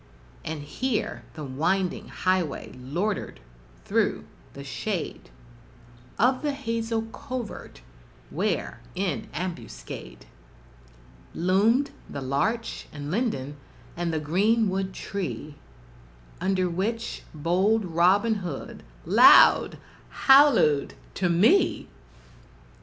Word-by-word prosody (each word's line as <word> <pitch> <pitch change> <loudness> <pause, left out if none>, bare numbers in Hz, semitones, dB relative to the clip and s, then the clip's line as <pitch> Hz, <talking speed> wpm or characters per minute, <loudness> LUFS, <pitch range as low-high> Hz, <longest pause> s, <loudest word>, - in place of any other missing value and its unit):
And 155 -2 -5
here 225 - -3
the 155 - -6
winding 165 +8 -1
highway 185 -5 -1
loitered 170 +12 -3 0.5
through - - 0 0.3
the 140 - -9
shade 165 - -4 0.9
Of 255 +4 +3
the 295 -2 -1
hazel 230 -4 -2
covert, 255 - -7 0.5
where, - - -2 0.2
in 180 -5 -2
ambuscade, 165 - -7 1.1
Loomed 210 +10 +2 0.2
the - - -5
larch 220 - -2
and 145 0 -6
linden, 155 - -2 0.4
and 175 -1 -2
the 160 - -1
green 205 +8 +2
wood 190 0 -2
tree 185 -6 -5 0.9
Under 185 0 +1
which 220 +7 -3
bold 190 +8 +1
Robin 185 +6 +3
Hood 170 -7 -6 0.2
loud - - +7 0.5
hallooed 270 - +5 0.2
to 180 - 0
me! 215 - +3
185 Hz, 90 wpm, -26 LUFS, 155-225 Hz, 1.1 s, loud